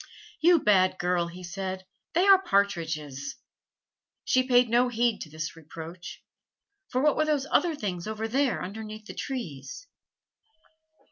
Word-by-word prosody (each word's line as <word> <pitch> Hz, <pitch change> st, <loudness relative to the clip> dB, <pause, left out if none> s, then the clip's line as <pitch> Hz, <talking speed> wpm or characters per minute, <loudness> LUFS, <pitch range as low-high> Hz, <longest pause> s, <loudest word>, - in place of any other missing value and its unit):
"You 345 Hz, +2 st, +6 dB
bad 185 Hz, -, +3 dB
girl!" 180 Hz, -2 st, 0 dB
he 180 Hz, +2 st, -10 dB
said, 190 Hz, +1 st, -5 dB, 0.3 s
"they 355 Hz, +3 st, +4 dB
are 390 Hz, -1 st, +7 dB
partridges." 160 Hz, -, -1 dB, 0.9 s
She 255 Hz, -, +3 dB
paid 245 Hz, -1 st, +5 dB
no 240 Hz, +2 st, +3 dB
heed 235 Hz, -1 st, +1 dB
to 155 Hz, -, -7 dB
this 155 Hz, +1 st, -5 dB
reproach, 165 Hz, +2 st, -9 dB, 0.7 s
for 255 Hz, +2 st, 0 dB
what 300 Hz, -, +4 dB
were 310 Hz, -, +2 dB
those 295 Hz, -3 st, +1 dB
other 345 Hz, -3 st, +3 dB
things 185 Hz, -7 st, -4 dB
over 220 Hz, +1 st, -3 dB
there 265 Hz, +2 st, +1 dB
underneath 215 Hz, +2 st, -7 dB
the -, -, -8 dB
trees? 265 Hz, -, -6 dB
210 Hz, 140 wpm, -27 LUFS, 175-255 Hz, 0.9 s, are